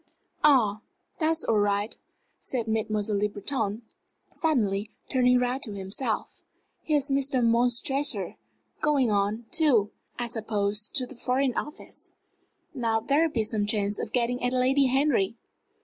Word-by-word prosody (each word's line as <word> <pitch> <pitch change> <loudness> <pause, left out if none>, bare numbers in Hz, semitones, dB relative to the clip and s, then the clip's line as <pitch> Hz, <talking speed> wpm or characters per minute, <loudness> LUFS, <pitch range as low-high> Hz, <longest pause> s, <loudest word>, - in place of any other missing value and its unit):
"Ah, 230 -8 +4 0.4
that's 320 0 +1
all 220 -2 +2
right!" 205 +1 0 0.4
said 235 -4 -3
Mademoiselle 215 -2 0
Le 210 +1 +1
Breton, 210 +1 -3 0.5
suddenly, 215 -10 0 0.2
turning 250 -1 +4
round 250 +2 0
to 215 -6 -4
himself. 200 +4 -4 0.4
"Here 305 -2 +1
is 285 0 -3
Mr. 270 -2 +1
Montresor 240 - +1 0.5
going 280 -6 +2
on, 205 +3 0
too, 245 -10 +3 0.3
I 240 - -2
suppose, 210 -2 -1
to 260 -3 +2
the - - -11
Foreign 255 +1 0
Office. 300 - -7 0.6
Now 230 -5 0
there'll 290 +8 +2
be 230 -7 0
some 210 -1 -1
chance 205 -1 0
of - - -4
getting 245 0 0
at 245 +1 +1
Lady 260 +2 +3
Henry." 255 -6 +2
235 Hz, 135 wpm, -27 LUFS, 210-270 Hz, 0.6 s, Ah